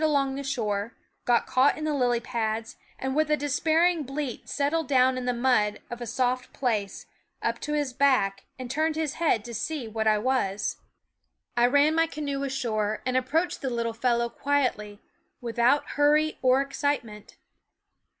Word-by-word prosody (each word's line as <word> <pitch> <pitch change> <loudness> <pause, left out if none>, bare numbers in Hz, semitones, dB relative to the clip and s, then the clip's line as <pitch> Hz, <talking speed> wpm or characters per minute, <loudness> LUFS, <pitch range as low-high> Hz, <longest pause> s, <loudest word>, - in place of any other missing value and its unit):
y 315 - +4
along 275 -3 +1
the 275 - -4
shore, 225 -5 -2 0.3
got 240 -1 +3
caught 260 +2 +3
in 310 - -5
the 305 -1 0
lily 245 -4 +2
pads, 225 -1 -3 0.2
and 265 0 -3
with 310 0 +2
a 300 - +3
despairing 315 +4 +2
bleat 275 -2 -5
settled 305 +3 0
down 260 -1 +4
in 255 -1 -4
the 250 - +1
mud 240 -4 +1
of 240 0 -6
a 240 - -4
soft 255 +2 -1
place, 215 -7 -2 0.4
up - - -1
to 300 - -4
his 290 -4 -1
back, 220 -8 +2
and 255 -1 -6
turned 315 +2 0
his 315 -3 -1
head 235 -10 +2
to 240 - -7
see 260 +3 -3
what 220 0 -2
I 215 -1 +4
was. 210 -4 -1 0.8
I 240 0 +4
ran 285 +4 +4
my 325 0 +3
canoe 285 -3 -4
ashore 220 -6 -2
and 255 0 -1
approached 295 +7 0
the 270 - -2
little 235 -1 -2
fellow 235 0 +1
quietly, 235 -6 -1 0.4
without 240 +4 +1
hurry 300 +2 +2
or 260 +1 +4
ex 275 0 -6
citement. 230 -8 -3
255 Hz, 175 wpm, -26 LUFS, 235-290 Hz, 0.8 s, y